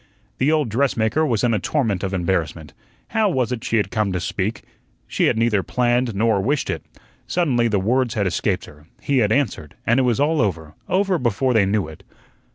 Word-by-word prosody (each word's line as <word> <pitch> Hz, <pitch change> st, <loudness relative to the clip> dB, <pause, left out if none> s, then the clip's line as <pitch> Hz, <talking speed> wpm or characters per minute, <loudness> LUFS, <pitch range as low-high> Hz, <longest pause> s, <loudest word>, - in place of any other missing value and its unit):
The 135 Hz, +4 st, +3 dB
old 150 Hz, -6 st, +1 dB
dressmaker 115 Hz, +2 st, +1 dB
was 120 Hz, -8 st, 0 dB
in 120 Hz, -1 st, +3 dB
a 105 Hz, -, +1 dB
torment 110 Hz, -, -1 dB
of 95 Hz, -, -2 dB
embarrassment. 85 Hz, -4 st, -2 dB, 0.4 s
How 220 Hz, -2 st, +2 dB
was 130 Hz, -, 0 dB
it 120 Hz, -3 st, -3 dB
she 115 Hz, -, 0 dB
had 100 Hz, -3 st, 0 dB
come 105 Hz, -4 st, 0 dB
to 90 Hz, -, -1 dB
speak? 95 Hz, +5 st, -3 dB, 0.4 s
She -, -, 0 dB
had -, -, +2 dB
neither 115 Hz, -3 st, +2 dB
planned 120 Hz, 0 st, 0 dB
nor 110 Hz, -1 st, +2 dB
wished 135 Hz, +6 st, 0 dB
it. -, -, -5 dB, 0.4 s
Suddenly 130 Hz, -10 st, +1 dB
the 105 Hz, -3 st, +1 dB
words 120 Hz, +4 st, +1 dB
had 105 Hz, -2 st, 0 dB
escaped 90 Hz, -, -1 dB
her, 75 Hz, +1 st, -16 dB
he 140 Hz, -2 st, +1 dB
had 105 Hz, -3 st, +2 dB
answered, 110 Hz, -, -1 dB
and 120 Hz, +3 st, +3 dB
it -, -, +3 dB
was 125 Hz, -1 st, +1 dB
all 150 Hz, +1 st, +2 dB
over 80 Hz, -7 st, -2 dB, 0.2 s
over 190 Hz, -1 st, +1 dB
before 125 Hz, +2 st, +1 dB
they 105 Hz, -4 st, +3 dB
knew 100 Hz, -3 st, 0 dB
it. 80 Hz, -1 st, -12 dB
115 Hz, 205 wpm, -21 LUFS, 100-130 Hz, 0.4 s, The